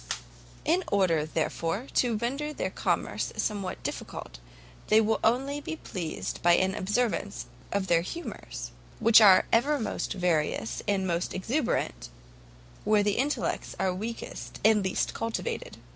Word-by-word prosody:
in 355 +4 +3
order, 170 -6 +2
therefore, 165 +6 -1
to 240 -3 +2
render 275 +7 -2
their - - -3
commerce - - -1
somewhat 200 -3 -2
difficult, - - -6 0.5
they 215 - +6
will 220 0 +2
only 270 +5 +1
be 320 - -4
pleased 175 - -5
by 175 0 +5
an 190 +2 +3
observance 205 0 -1 0.3
of 200 -1 0
their 170 -3 +3
humours: 170 - -6 0.3
which 230 0 +7
are 195 -3 +8
ever 280 +6 +3
most 220 - -2
various 155 -10 0
and 195 -2 +1
most 170 -1 -1
exuberant 230 - -1 0.7
where 210 0 +4
the 205 -1 +1
intellects 285 +4 -1
are 190 -1 +1
weakest 180 - -6
and 215 -2 +5
least 190 - 0
cultivated. 470 - -3
205 Hz, 135 wpm, -28 LUFS, 180-240 Hz, 0.7 s, are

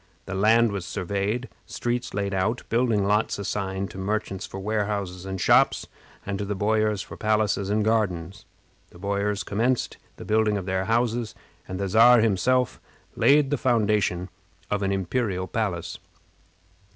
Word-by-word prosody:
The 95 - -6
land 110 +3 +4
was 100 -3 -3
surveyed, 100 +8 -2 0.2
streets 120 +1 -3
laid 100 -1 -2
out, 100 +6 0
building 115 -4 +2
lots 105 +2 +1
assigned 100 -1 -3
to 95 - -9
merchants 100 -1 -3
for 95 - -7
warehouses 100 -3 -2
and 95 0 -4
shops, - - +4 0.4
and 100 0 -3
to 100 - -2
the 105 +1 -3
boyars 105 0 +1
for - - -10
palaces 105 -2 0
and 105 +1 +1
gardens. 100 -3 -1 0.4
The - - -16
boyars 100 +2 -1
commenced 120 +5 0 0.2
the - - -10
building 110 -1 +2
of 95 - -5
their 95 0 -1
houses, 115 +1 0 0.3
and 95 0 -5
the 100 - -1
Czar 115 +5 +7
himself 125 +4 +1 0.3
laid 145 0 +4
the 145 - 0
foundation 105 -7 +1 0.4
of 105 -1 0
an 100 0 0
imperial 95 0 -1
palace. 95 -5 -3
105 Hz, 150 wpm, -25 LUFS, 95-110 Hz, 0.4 s, Czar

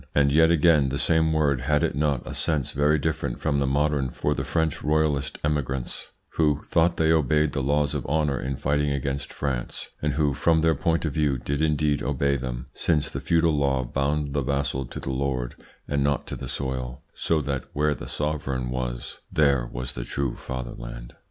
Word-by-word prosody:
And 70 -1 +4
yet 80 +3 +5
again, 80 -4 +4
the 70 - -2
same 80 +3 +2
word 75 -5 +2
had 75 +2 +2
it - - +1
not 70 -3 0
a - - -6
sense 75 -5 +1
very 75 +2 +3
different 80 -4 -2
from 70 -2 +1
the 70 - +1
modern 70 -1 +1
for - - -1
the - - -3
French 80 -2 -1
royalist 75 -2 +1
emigrants, 70 -4 -2 0.3
who 75 -3 +2
thought 85 +1 +2
they 80 0 +3
obeyed 75 -1 +3
the 70 - -1
laws 70 +2 +1
of - - -2
honour 75 -2 +1
in 65 +2 -2
fighting 75 +2 +1
against 70 0 -2
France, 65 -4 -3
and 75 -1 0
who 75 -1 +2
from 80 +3 +3
their 80 0 +4
point 80 +3 0
of 75 - -2
view 75 -4 +1
did 70 +4 -2
indeed 75 -1 +2
obey 70 +1 +1
them, 65 -2 -4
since 75 -4 0
the - - -4
feudal 85 -1 +3
law 70 -2 +1
bound 70 +3 -1
the 70 - +1
vassal 70 -1 -1
to - - -7
the 65 - -4
lord 65 -2 -1 0.3
and 70 -1 +1
not 70 0 0
to - - -5
the - - -6
soil, 65 -2 -4
so 80 - +1
that 70 -2 -3
where 75 0 +2
the - - -8
sovereign 70 -4 -2
was - - -4
there 70 -5 +3
was 65 +1 -4
the - - -4
true 65 0 -2
fatherland? - - -7
70 Hz, 195 wpm, -25 LUFS, 65-75 Hz, 0.3 s, yet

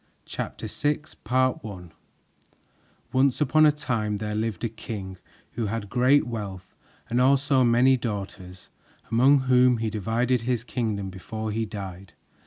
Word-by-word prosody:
CHAPTER - - -5
VI 145 +1 0
THE 150 - -17
BEGGAR 130 +3 +1
PRINCESS 90 -6 -9 1.2
Once 130 0 +3
upon 155 +1 +5
a - - +6
time 115 -8 -2
there 105 +1 -4
lived 110 -3 -2
a - - +2
king 100 -4 -7 0.3
who 115 -1 -2
had 105 -1 -4
great 130 +3 +4
wealth 100 -6 -6 0.3
and 120 +2 +1
also 135 0 +4
many 125 +2 +4
daughters, 95 -5 -6 0.4
among 130 +4 +5
whom 125 -1 +4
he 110 -1 -2
divided 115 +4 0
his 120 -1 -1
kingdom 110 -6 -3
before 110 +4 -5
he 110 +1 -2
died. 100 -3 -8
115 Hz, 145 wpm, -25 LUFS, 105-130 Hz, 1.2 s, a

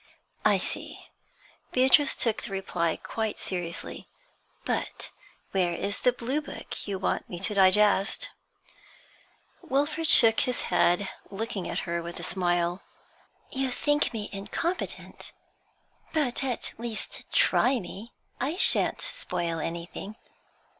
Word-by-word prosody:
'I - - +5
see.' - - -5 0.7
Beatrice 265 +3 +5
took 230 -3 +1
the - - -6
reply 180 -4 -1
quite 220 -2 -3
seriously. 175 -3 -4 0.6
'But - - -3 0.4
where 180 -3 +1
is 200 +4 -1
the 250 - +4
blue 250 +5 -2
book 290 - -8
you 200 -1 -2
want 190 - -1
me 175 - -5
to 195 - +1
digest?' 200 - +4 1.3
Wilfrid 295 +4 0
shook 225 -7 +7
his 250 -2 0
head, 180 +3 +3 0.2
looking 205 -1 -4
at - - -2
her 170 -1 -1
with 170 +1 -7
a - - -6
smile. 175 0 0 0.7
'You 265 0 -1
think 290 +3 +1
me 215 -3 -4
incompetent? 275 - -4 0.8
But 280 -6 +1
at 255 -3 -2
least 230 -2 -5
try 255 0 +4
me. 200 +4 -9 0.3
I 295 +7 -1
shan't - - +5
spoil 165 -1 -2
anything.' 170 +6 -5
210 Hz, 120 wpm, -28 LUFS, 180-255 Hz, 1.3 s, shook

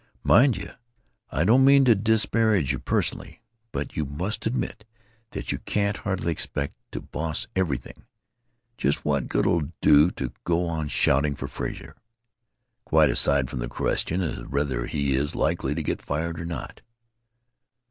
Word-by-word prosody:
"Mind 125 -4 +5
you, 100 +1 -7 0.6
I 75 - 0
don't 120 +9 +5
mean 140 0 +6
to 120 - +7
disparage 110 - +2
you 65 - -2
personally, - - -2 0.3
but 70 0 -4
you 80 - 0
must 85 +11 -3
admit 110 -2 -3 0.5
that - - -4
you - - -3
can't 100 0 -1
hardly 95 -7 -2
expect 70 -2 -2 0.2
to - - -4
boss 80 0 -3
everything. 85 -9 -3 0.7
Just 70 +2 0
what 70 -4 0
good - - 0
'll 85 - +3
it 75 +1 -7
do 75 +3 +6
to 65 -8 -5
go 85 0 +1
on 80 -3 -2
shouting 70 0 +2
for - - -5
Frazer? - - -6 0.9
Quite 80 -6 +4
aside 70 -2 +2
from 60 - -5
the - - -3
question 85 +8 -1
of 85 - -5
whether 70 -4 -1
he 70 -3 0
is 70 +2 -1
likely - - 0
to - - -2
get - - -2
fired 80 +3 -3
or 85 - -5
not." 85 -1 -6
80 Hz, 160 wpm, -25 LUFS, 70-100 Hz, 0.9 s, to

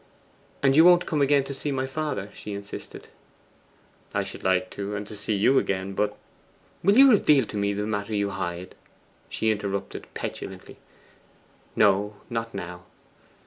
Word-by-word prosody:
'And 135 -1 +4
you 160 - +8
won't 175 0 +6
come 150 -2 0
again 140 0 +4
to 140 - -5
see 140 +2 -3
my 130 -1 -1
father?' 135 -7 -3
she 105 - -7
insisted. 100 0 -9 1.1
'I - - +2
should - - -9
like 95 +3 +1
to 100 +1 -4
and 105 0 -4
to 105 - -9
see 105 +1 -1
you 130 +7 +4
again, 95 0 -2
but 105 +1 -1 0.3
' - - -34
'Will 200 +5 +4
you 270 0 +9
reveal 150 - +5
to 105 - -9
me 100 0 +1
that 105 +1 -2
matter 105 0 -2
you 100 -1 0
hide?' 90 -1 -5 0.6
she 110 - +1
interrupted 100 -2 -4
petulantly. - - -6 1.0
'No; 105 0 +3 0.2
not 115 -1 -3
now. 90 -2 -7
105 Hz, 165 wpm, -26 LUFS, 100-135 Hz, 1.1 s, you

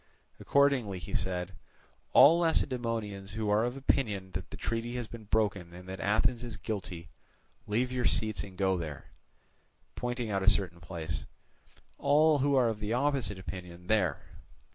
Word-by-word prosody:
Accordingly 140 -9 +2
he 90 - -8
said: 90 0 -1 0.6
"All 165 +4 +8
Lacedaemonians 115 - 0
who 110 -1 -1
are 105 +2 +4
of 120 +2 -2
opinion 105 -8 0
that 95 0 -5
the - - -8
treaty 115 +1 -3
has 120 -2 -3
been 115 -1 -10
broken, 100 -5 0
and 90 +1 -11
that 95 0 -6
Athens 115 +4 +1
is 120 -3 -6
guilty, 95 -6 -5 0.6
leave 120 +4 0
your 125 -1 -1
seats 110 -1 +1
and 95 -2 -11
go 95 -2 +2
there," 75 -4 -7 0.8
pointing 120 -2 -3
out 100 -1 0
a 95 - +5
certain 95 -5 +1
place; 85 -3 -5 0.7
"all 150 +1 +4
who 140 +1 +2
are 125 -3 +4
of 110 -2 -3
the 105 +1 -2
opposite 135 -5 0
opinion, 90 -2 -8
there." 95 -7 +2
105 Hz, 160 wpm, -30 LUFS, 95-125 Hz, 0.8 s, All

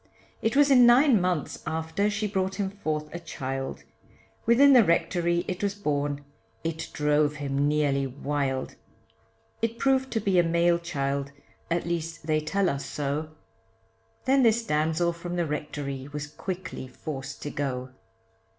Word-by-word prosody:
It 225 +2 0
was 285 0 +5
in 250 -2 +8
nine 245 -3 +6
months 180 -4 -1
after 160 +6 0
she 210 +1 -2
brought 190 -1 -1
him 195 -2 -2
forth 155 -6 -3
a 170 - -4
child, 135 -5 -5 0.6
Within 275 +4 +7
the 245 -3 +8
rectory 170 0 +1
it 180 - -3
was 200 -1 0
born, 145 -6 -2 0.4
it 165 0 -3
drove 150 0 +2
him 140 0 0
nearly 145 -2 +1
wild: 135 0 -2 0.9
It 230 0 -1
proved 265 0 +2
to 225 - +1
be 195 -3 +2
a - - +5
male 170 +1 +3
child, 140 -4 -2 0.4
at 170 0 0
least 165 -1 -3
they 155 -1 +2
tell 190 +6 0
us 140 -4 -1
so, 145 +2 -3 1.0
Then 270 +1 +4
this 230 -1 +3
damsel 160 +1 +1
from 175 +1 -6
the 175 -1 +1
rectory 145 -3 -4
was 145 0 -4
quickly 180 -1 -6
forced 135 +1 -7
to 145 - -4
go. 130 -2 -3
165 Hz, 150 wpm, -27 LUFS, 145-195 Hz, 1.0 s, in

